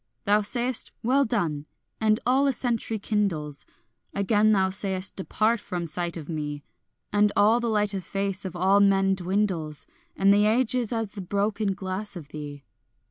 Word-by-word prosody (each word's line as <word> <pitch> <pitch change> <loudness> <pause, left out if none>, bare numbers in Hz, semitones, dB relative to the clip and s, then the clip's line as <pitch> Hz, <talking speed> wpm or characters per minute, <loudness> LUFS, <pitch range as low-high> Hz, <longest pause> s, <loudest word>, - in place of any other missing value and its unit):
Thou 210 +1 +4
sayest 240 +3 0
"Well 270 +4 +3
done," 160 -10 -2 0.3
and 215 0 +2
all 265 +3 +3
a 275 - +2
century 230 -2 -1
kindles; 185 -9 -2 0.5
Again 205 +2 +3
thou 190 -2 +2
sayest 190 -1 +2
"Depart 215 +4 0
from 175 -3 -4
sight 170 +1 -3
of 155 -3 -8
me," 150 -3 -4 0.5
And 205 0 +4
all 215 +4 +4
the 235 -1 -1
light 210 -2 +1
of 190 -2 -3
face 195 +1 -2
of 185 -2 -6
all 190 +3 +3
men 195 -1 +4
dwindles, 180 -5 -2 0.3
And 195 +1 +4
the 205 +1 +4
age 235 +2 +2
is 245 -3 -1
as 225 -3 -2
the 205 - -7
broken 200 +1 -1
glass 190 +2 -4
of 155 -5 -9
thee. 145 -2 -8
200 Hz, 170 wpm, -26 LUFS, 180-215 Hz, 0.5 s, Thou